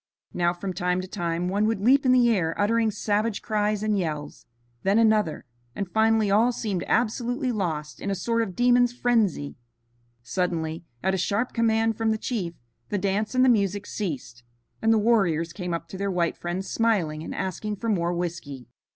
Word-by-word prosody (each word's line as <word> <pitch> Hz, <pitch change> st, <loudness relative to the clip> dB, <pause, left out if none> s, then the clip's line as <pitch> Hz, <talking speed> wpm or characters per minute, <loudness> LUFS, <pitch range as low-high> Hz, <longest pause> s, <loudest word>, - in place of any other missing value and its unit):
Now, 175 Hz, -1 st, +2 dB
from 185 Hz, +2 st, -5 dB
time 180 Hz, 0 st, 0 dB
to 185 Hz, -, -7 dB
time, 175 Hz, -2 st, -2 dB
one 205 Hz, +3 st, +1 dB
would 225 Hz, -2 st, 0 dB
leap 260 Hz, +6 st, +4 dB
in -, -, +5 dB
the 250 Hz, -1 st, +5 dB
air 165 Hz, -6 st, 0 dB
uttering 225 Hz, +2 st, +2 dB
savage 210 Hz, +1 st, -1 dB
cries 210 Hz, -1 st, 0 dB
and 215 Hz, -1 st, +1 dB
yells, 155 Hz, -6 st, -4 dB, 0.3 s
then 195 Hz, +2 st, +2 dB
another, 215 Hz, -10 st, +2 dB, 0.3 s
and 200 Hz, -, -3 dB
finally 220 Hz, +1 st, +2 dB
all 225 Hz, +5 st, +4 dB
seemed 205 Hz, -7 st, -3 dB
absolutely 245 Hz, +3 st, 0 dB
lost 160 Hz, -8 st, -3 dB
in 200 Hz, -, -3 dB
a 195 Hz, -, 0 dB
sort 230 Hz, +5 st, 0 dB
of 195 Hz, -6 st, -3 dB
demon's 245 Hz, 0 st, +4 dB
frenzy. 220 Hz, -14 st, 0 dB, 0.7 s
Suddenly, 165 Hz, +3 st, -2 dB, 0.2 s
at 190 Hz, +1 st, +2 dB
a 190 Hz, -, 0 dB
sharp 205 Hz, +7 st, 0 dB
command 225 Hz, -1 st, +2 dB
from 225 Hz, -1 st, +1 dB
the 220 Hz, -, +1 dB
chief, 195 Hz, -8 st, -3 dB, 0.3 s
the 205 Hz, -, 0 dB
dance 200 Hz, +5 st, -1 dB
and 255 Hz, 0 st, +5 dB
the -, -, +4 dB
music 205 Hz, -4 st, +2 dB
ceased, 145 Hz, -, -5 dB, 0.4 s
and 225 Hz, -, +3 dB
the 225 Hz, -, +5 dB
warriors 190 Hz, -8 st, +2 dB
came 180 Hz, -1 st, -4 dB
up 165 Hz, 0 st, -3 dB
to 190 Hz, -, -8 dB
their 200 Hz, 0 st, -1 dB
white 175 Hz, -3 st, 0 dB
friends 175 Hz, +2 st, -4 dB
smiling 185 Hz, -10 st, 0 dB
and -, -, -6 dB
asking 210 Hz, +3 st, -3 dB
for 230 Hz, -, -5 dB
more 175 Hz, -5 st, +1 dB
whiskey. 170 Hz, -7 st, -4 dB
200 Hz, 185 wpm, -25 LUFS, 175-225 Hz, 0.7 s, in